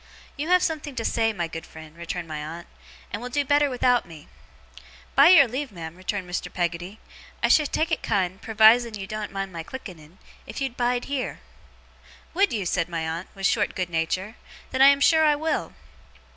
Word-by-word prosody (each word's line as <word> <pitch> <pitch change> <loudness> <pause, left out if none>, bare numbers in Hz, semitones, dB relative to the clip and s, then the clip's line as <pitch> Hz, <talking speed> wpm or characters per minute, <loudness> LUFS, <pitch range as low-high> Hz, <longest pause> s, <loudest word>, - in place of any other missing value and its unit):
'You 295 +3 -4
have 360 +1 +4
something 300 -4 -3
to 230 -2 -3
say, 225 -1 +1
my 175 -5 -3
good 165 0 -7
friend,' 160 -1 -13
returned 170 0 -5
my 155 -1 -5
aunt, 165 +3 -7 0.5
'and 205 - -3
will 250 - -5
do 285 +3 0
better 290 0 +3
without 250 -1 +2
me.' 160 -3 -13 0.9
'By 280 +3 +7
your 305 -7 +8
leave, 260 +2 -4
ma'am,' 165 -3 -8
returned 185 +1 -4
Mr. 180 +1 -4
Peggotty, 175 +3 -3 0.4
'I - - +5
should 300 -2 +4
take 320 +1 0
it 320 - 0
kind, 190 -3 -1
pervising 220 +1 +4
you 195 -2 -6
doen't 215 +1 -5
mind 195 -1 -4
my 165 - -5
clicketten, 175 -5 -10 0.3
if - - -7
you'd 265 -3 -3
bide 245 0 0
heer.' 275 -2 -3 0.9
'Would 395 +4 +2
you?' 210 -5 -2
said 175 0 -1
my 165 -2 -3
aunt, 165 +3 -4
with 195 0 -4
short - - +1
good 180 -2 -3
nature. 185 +6 -2 0.3
'Then 260 - 0
I 270 - +9
am 280 0 +5
sure 315 +2 +5
I 300 -1 +4
will! 310 0 -2
215 Hz, 200 wpm, -25 LUFS, 175-275 Hz, 0.9 s, I